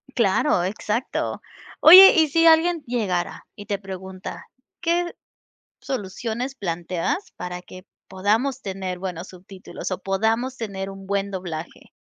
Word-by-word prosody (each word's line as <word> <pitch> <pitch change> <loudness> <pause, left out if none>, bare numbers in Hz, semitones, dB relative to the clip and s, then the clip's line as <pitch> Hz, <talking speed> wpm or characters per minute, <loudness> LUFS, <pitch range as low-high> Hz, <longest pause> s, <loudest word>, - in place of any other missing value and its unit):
Claro, 190 -5 +2
exacto. 210 +5 -3 0.4
Oye, 375 +4 +11
y 320 - +4
si 330 +3 +2
alguien 325 0 +4
llegara 205 -8 -2
y 205 - -10
te 200 -1 -3
pregunta, 190 0 -8 0.4
¿qué 345 0 0 0.7
soluciones 235 +3 -4
planteas 175 - -3
para 180 0 -6
que 185 +1 -13 0.2
podamos 220 +8 0
tener 190 -2 -5
buenos 180 -1 -5
subtítulos 185 +1 -9
o 185 - -1
podamos 225 +7 0
tener 195 -4 -5
un 195 0 -11
buen 200 0 -1
doblaje? 175 -4 -7
195 Hz, 125 wpm, -23 LUFS, 185-255 Hz, 0.7 s, Oye